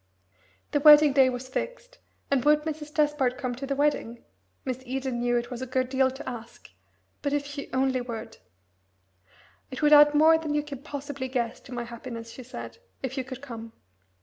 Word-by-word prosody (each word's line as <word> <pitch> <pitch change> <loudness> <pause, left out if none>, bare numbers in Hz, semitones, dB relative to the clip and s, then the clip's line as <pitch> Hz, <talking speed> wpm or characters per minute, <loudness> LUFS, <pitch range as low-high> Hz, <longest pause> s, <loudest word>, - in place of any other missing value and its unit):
The 290 - +2
wedding 295 -1 +8
day 265 -2 +5
was 250 0 -5
fixed, - - -5 0.3
and 275 -3 +2
would 300 +1 +4
Mrs. 305 -1 -5
Despard 295 -5 +1
come 255 -2 -3
to 265 +3 -6
the 275 - -1
wedding? 275 -5 -1 0.4
Miss 260 -1 -3
Eden 260 -1 -3
knew 240 0 +1
it 240 +1 -3
was 245 0 -5
a 260 - -4
good 255 0 0
deal 265 0 +3
to 265 +3 -9
ask; 235 -2 -8 0.5
but 285 -1 -1
if 290 0 0
she 285 0 -7
only 260 -1 +1
would! 230 -2 -7 1.3
"It 260 - -6
would 300 0 +6
add 295 0 +8
more 320 +2 +6
than 305 -2 -2
you 295 - +1
can 285 -3 -8
possibly 285 -2 -5
guess 245 -3 -2
to 260 - -15
my 245 -1 -3
happiness," 235 -1 -8
she 255 - -10
said, 255 - -9 0.2
"if 265 0 -3
you 265 - -2
could 260 +1 -9
come. 230 -4 -8
265 Hz, 195 wpm, -27 LUFS, 245-295 Hz, 1.3 s, wedding